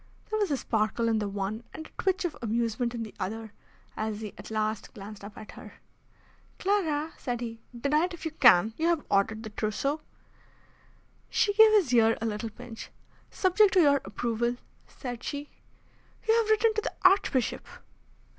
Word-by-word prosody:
There 435 - 0
was 410 - +1
a 285 - +1
sparkle 225 0 0
in 225 -1 +2
the 205 - -2
one 200 +3 -3
and 315 - -7
a - - -8
twitch 380 0 +1
of 340 - -2
amusement 235 +1 -1
in 230 - -3
the 215 - -9
other, 220 +2 -4 0.4
as 215 0 -3
he 210 -2 -6
at - - -10
last 215 -1 -2
glanced 205 0 -9
up 205 +1 -10
at 215 - -9
her. - - -12 0.8
"Clara," 325 -6 0
said 245 -3 -3
he, 230 -1 -6 0.2
"deny 300 +6 +2
it 365 - -6
if 340 - -11
you 320 - -2
can! 225 - +6
You 325 - +1
have 340 -3 +1
ordered 210 +2 +1
the 220 - -7
trousseau." 250 +9 -1 1.3
She 410 - +2
gave 440 +1 +8
his 360 -12 +3
ear 225 -1 +5
a 225 - -3
little 220 +1 -2
pinch. 230 +1 -10 0.4
"Subject 385 +2 +3
to 375 - +5
your 285 -3 +4
approval," 235 +4 -1 0.3
said 245 -3 -7
she. 290 0 -5 0.8
"You 445 - +5
have 455 -1 +2
written 435 +1 +4
to 430 - 0
the - - -4
Archbishop." 370 - +3
240 Hz, 180 wpm, -28 LUFS, 220-325 Hz, 1.3 s, gave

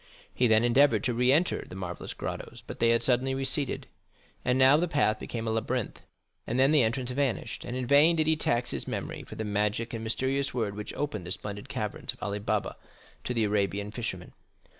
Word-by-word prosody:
He 125 - +3
then 110 0 +4
endeavored 135 +4 +4
to 125 -3 +1
re 125 +2 +3
enter 165 +6 +2
the - - -11
marvellous 90 -2 -6
grottos, - - -6
but - - -8
they 115 - +4
had 115 0 +3
suddenly 130 +1 +2
receded, 135 +1 -1 0.6
and 125 +1 +2
now 130 +2 +7
the 170 +4 +2
path 125 -9 +1
became 115 -1 -5
a - - +1
labyrinth, 115 +1 -2 0.5
and 120 +3 -1
then 135 +2 +5
the 155 -3 +5
entrance 125 +2 0
vanished, 135 -2 -1
and 120 - -4
in 130 - -2
vain 145 +6 +6
did 155 -1 +2
he 160 +1 +3
tax 120 -5 0
his 70 - -3
memory - - -4
for - - -10
the 110 - -3
magic 105 +3 -1
and 115 -1 -4
mysterious 130 +5 -1
word 110 -5 -1
which 105 0 -6
opened 105 -12 -3
the - - -5
splendid 100 +1 -5
caverns 105 -1 -3
of - - -12
Ali 100 0 -2
Baba 105 - -1 0.5
to 125 - -1
the 115 - +2
Arabian 100 0 0
fisherman. 105 -6 -5
120 Hz, 210 wpm, -28 LUFS, 105-135 Hz, 0.6 s, now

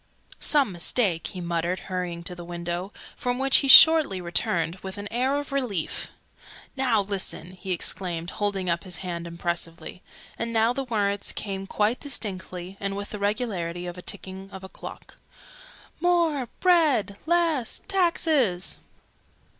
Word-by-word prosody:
"Some 285 -8 +3
mistake!" 175 0 +3
he 185 - -6
muttered, 170 +1 -1
hurrying 180 -2 -4
to 180 - -4
the 175 -1 -9
window, 175 +2 -4 0.2
from 245 0 -2
which 270 +1 +5
he 275 - +1
shortly 310 - +9
returned 175 -1 0
with 190 +1 -8
an 205 0 -5
air 260 +3 +1
of 290 -1 -5
relief. 245 - -1 0.7
"Now 250 -5 +2
listen!" 195 -3 -3
he 185 +1 -7
exclaimed, 175 -1 -1
holding 200 -3 -2
up 170 -1 0
his 180 -3 -4
hand 170 -1 -4
impressively. 170 +1 -4 0.4
And 230 0 -2
now 225 +1 +3
the 270 +1 -3
words 205 -4 0
came 195 -2 -5
quite 215 +6 +1
distinctly, 185 -7 -4
and 195 0 -3
with 200 +1 -5
the 210 - -5
regularity 200 -5 -2
of 175 - -5
the 180 - -10
ticking 190 0 -5
of 190 0 -9
a 190 - -8
clock, - - -11 0.8
"More 330 -8 +1
bread 305 - +3
Less 330 -8 +1
taxes!'" 315 - +1
200 Hz, 145 wpm, -26 LUFS, 180-250 Hz, 0.8 s, shortly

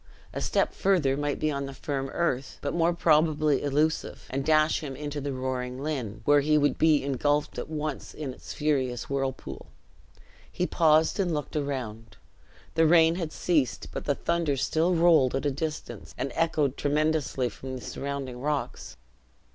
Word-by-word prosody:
A - - -4
step - - +1
further 170 -9 +2
might 145 0 -1
be 155 0 +1
on 140 -1 -3
the 135 - -8
firm 135 -1 -3
earth, 135 -6 -1
but 140 - -2
more 170 0 +3
probably 155 -3 +3
illusive, 150 +3 0
and 135 +1 -1
dash 155 +1 +3
him 140 -4 -6
into 145 +1 -5
the 140 +1 -3
roaring 130 -1 -3
Lynn, 125 -9 -3
where 145 0 +6
he 150 +2 +3
would 145 -1 +1
be 155 -3 +4
ingulfed 145 +2 0
at - - -6
once 150 -2 -4
in 145 -4 -5
its - - -10
furious 130 -5 -1
whirlpool. 135 -1 -3 0.8
He 180 - -1
paused 160 0 +3
and 185 -3 +1
looked 150 0 -5
around. 115 -7 -4 0.6
The 160 0 +4
rain 165 0 +6
had 170 -3 -3
ceased, 155 -9 0
but - - -5
the 145 - +1
thunder 170 -4 0
still 165 +6 +1
rolled 165 -7 +4
at 135 - -2
a 145 - +2
distance 155 +3 -5
and 135 - -2
echoed 155 -4 +1
tremendously 150 -3 +1
from 130 +4 -7
the 125 - -7
surrounding 135 -3 -5
rocks. 150 0 -3
145 Hz, 170 wpm, -27 LUFS, 135-155 Hz, 0.8 s, where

